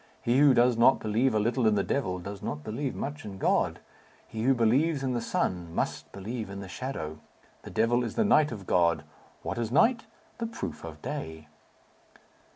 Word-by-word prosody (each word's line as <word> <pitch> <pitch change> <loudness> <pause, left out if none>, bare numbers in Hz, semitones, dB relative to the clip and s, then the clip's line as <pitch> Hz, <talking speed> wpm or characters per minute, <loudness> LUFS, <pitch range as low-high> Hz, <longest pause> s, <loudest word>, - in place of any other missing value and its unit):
He 120 +3 +3
who 140 -3 +6
does 120 0 +4
not 125 +3 +6
believe 110 +3 +1
a - - +3
little 115 +2 +1
in 110 - +4
the 100 - +2
devil, 95 -10 -1
does 100 +2 -7
not 75 0 -4
believe 130 +5 -3
much 145 +2 -5
in 100 -2 -7
God. - - +1 0.5
He 110 - -5
who 130 +3 +3
believes 135 +6 +2
in 130 -1 0
the 120 - -1
sun 90 -6 -2
must - - -2
believe 110 +3 -5
in 100 0 -6
the 100 - -7
shadow. 80 - -5 0.4
The - - -10
devil 120 +2 +2
is 120 - -4
the 225 - +2
night 155 -8 +4
of 100 -5 -7
God. 85 -2 +2 0.4
What - - -3
is 115 -1 -2
night? 225 - +3 0.3
The 230 - -1
proof 95 - -6
of - - -9
day." 80 -1 -6
115 Hz, 195 wpm, -28 LUFS, 100-135 Hz, 0.5 s, who